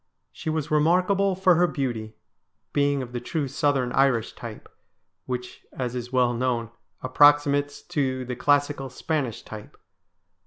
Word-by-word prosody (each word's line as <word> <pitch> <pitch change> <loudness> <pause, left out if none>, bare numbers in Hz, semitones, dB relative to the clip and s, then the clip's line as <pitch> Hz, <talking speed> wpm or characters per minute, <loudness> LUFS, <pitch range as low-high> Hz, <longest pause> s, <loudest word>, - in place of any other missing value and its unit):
She - - -6
was 155 -1 -2
remarkable 185 +5 +3
for 185 0 +4
her 175 +1 +3
beauty, 120 -8 -3 0.6
being 140 -1 +1
of 120 - -9
the 125 - -3
true 145 +3 -2
southern 135 -2 0
Irish 125 -4 +2
type, - - -9 0.6
which, 125 -1 -5
as 125 -2 -3
is 125 -1 -5
well 125 -2 +2
known, 120 -2 -1 0.3
approximates 145 +1 +3
to 130 -3 -2
the 125 0 -4
classical 145 0 +1
Spanish 130 -2 -3
type. 110 -1 -10
135 Hz, 140 wpm, -25 LUFS, 125-150 Hz, 0.6 s, for